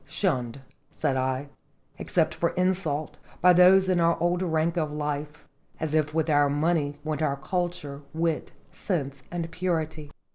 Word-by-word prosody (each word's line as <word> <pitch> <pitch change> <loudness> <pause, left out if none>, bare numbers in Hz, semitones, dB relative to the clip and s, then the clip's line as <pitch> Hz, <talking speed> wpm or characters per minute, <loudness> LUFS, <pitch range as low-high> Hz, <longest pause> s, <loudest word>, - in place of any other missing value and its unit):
"Shunned," 130 - -1 0.3
said 145 -4 -1
I, 130 +2 -1 0.5
"except - - +1
for - - 0
insult, 180 -5 -1 0.2
by 180 0 +6
those 185 +2 +6
in 185 -2 +2
our 170 0 +3
old 175 +1 +1
rank 165 -2 0
of 155 -3 -1
life, 150 0 -4 0.3
as 160 -1 -2
if 155 -1 +2
with 160 0 0
our 145 -2 +4
money 145 0 +1
went 155 -1 -2
our 140 -3 +1
culture, 170 -3 -3
wit, 165 0 -1 0.2
sense, 140 -8 -3
and 170 -1 -4
purity." 160 -4 -2
155 Hz, 150 wpm, -26 LUFS, 145-175 Hz, 0.5 s, by